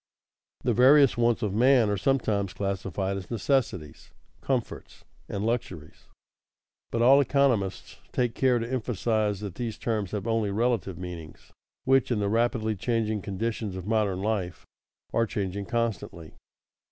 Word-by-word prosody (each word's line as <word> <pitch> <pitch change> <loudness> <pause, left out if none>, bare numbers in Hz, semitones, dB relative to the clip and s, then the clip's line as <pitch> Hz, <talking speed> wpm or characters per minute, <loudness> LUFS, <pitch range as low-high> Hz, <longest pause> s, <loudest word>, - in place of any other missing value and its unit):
The - - +2
various 135 +2 +6
wants 120 0 +1
of 100 -3 -1
man 125 +1 +4
are - - +1
sometimes 105 -4 0
classified 95 -1 -2
as 95 -3 -8
necessities, 110 - -1 0.3
comforts, - - -4 0.2
and 100 +1 -3
luxuries, 90 -10 -4 0.8
but 115 0 0
all 135 +3 +7
economists 125 -8 0
take 120 -2 0
care 130 -2 +2
to 115 0 -3
emphasize 110 -4 -1
that 100 -4 -5
these 115 0 -4
terms 110 -5 -2
have 105 -1 -4
only 115 -2 0
relative 105 -4 0
meanings 85 -3 -9 0.3
which, 135 -1 +3
in 120 - +1
the 100 -1 0
rapidly 115 -1 +1
changing 110 0 -1
conditions 105 +1 -3
of 95 -1 -6
modern 105 -3 0
life, 100 -5 -2 0.5
are 115 0 +2
changing 100 -1 -3
constantly. 115 -8 -3
110 Hz, 140 wpm, -27 LUFS, 95-120 Hz, 0.8 s, all